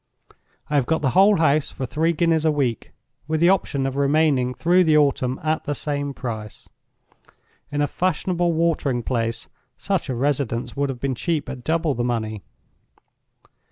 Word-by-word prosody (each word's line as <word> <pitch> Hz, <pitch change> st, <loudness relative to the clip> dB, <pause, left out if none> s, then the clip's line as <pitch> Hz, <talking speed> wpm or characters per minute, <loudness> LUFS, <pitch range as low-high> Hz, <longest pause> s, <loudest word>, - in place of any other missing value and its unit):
I -, -, -6 dB
have 140 Hz, -4 st, +2 dB
got 160 Hz, -1 st, 0 dB
the 135 Hz, -, +2 dB
whole 195 Hz, -, +5 dB
house 155 Hz, -2 st, +2 dB
for 130 Hz, -, -5 dB
three 160 Hz, +6 st, 0 dB
guineas 165 Hz, -1 st, +1 dB
a 160 Hz, -, +3 dB
week, 130 Hz, -7 st, -2 dB, 0.4 s
with 160 Hz, 0 st, 0 dB
the 170 Hz, +2 st, +5 dB
option 145 Hz, -8 st, +1 dB
of 135 Hz, 0 st, -2 dB
remaining 140 Hz, -3 st, +2 dB
through 175 Hz, +8 st, +3 dB
the 155 Hz, -3 st, +4 dB
autumn 135 Hz, -3 st, +1 dB
at 155 Hz, 0 st, -1 dB
the 145 Hz, -, -2 dB
same 145 Hz, -1 st, -2 dB
price. 110 Hz, -4 st, -7 dB, 1.0 s
In 145 Hz, 0 st, -1 dB
a -, -, +1 dB
fashionable 175 Hz, +1 st, 0 dB
watering 160 Hz, -7 st, 0 dB
place, 115 Hz, -2 st, -2 dB, 0.3 s
such 195 Hz, -6 st, -2 dB
a 130 Hz, -, -1 dB
residence 130 Hz, -2 st, -1 dB
would 140 Hz, 0 st, 0 dB
have 130 Hz, -2 st, -5 dB
been 135 Hz, 0 st, -1 dB
cheap 155 Hz, +3 st, -2 dB
at 125 Hz, -2 st, -7 dB
double 160 Hz, 0 st, 0 dB
the 120 Hz, -, -2 dB
money. 110 Hz, -3 st, -2 dB
145 Hz, 170 wpm, -22 LUFS, 125-160 Hz, 1.0 s, whole